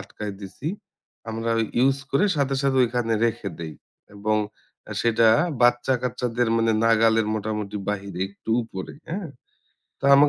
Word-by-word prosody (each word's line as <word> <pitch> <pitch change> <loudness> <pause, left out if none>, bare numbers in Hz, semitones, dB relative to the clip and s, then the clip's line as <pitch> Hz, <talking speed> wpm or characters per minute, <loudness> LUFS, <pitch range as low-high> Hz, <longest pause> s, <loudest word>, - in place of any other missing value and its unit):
আটকায় 105 -1 -6
দিছি। 100 +10 -6 0.6
আমরা 115 +1 -2 0.3
ইউস 135 +2 +4
করে 140 +9 +3
সাথে, 140 -1 +1
সাথে 135 -1 +2
ঐখানে 115 -1 0
রেখে 105 -3 -2
দেই। 80 -2 -6 0.4
এবং 110 +1 0 0.7
সেটা 115 -1 +4
আ - - +3 0.2
বাচ্চা 120 +2 +4
কাচ্চাদের 120 -1 0
মানে 115 0 +3
নাগালের 115 -1 +4
মোটামুটি 105 -1 -3
বাহিরে 100 -3 -3
একটু 100 +3 -9
উপরে। 95 -4 -7 0.2
হ্যাঁ? 180 -1 -3 0.7
তো - - -10
আমার 145 +1 +7
115 Hz, 140 wpm, -24 LUFS, 105-125 Hz, 0.7 s, আমার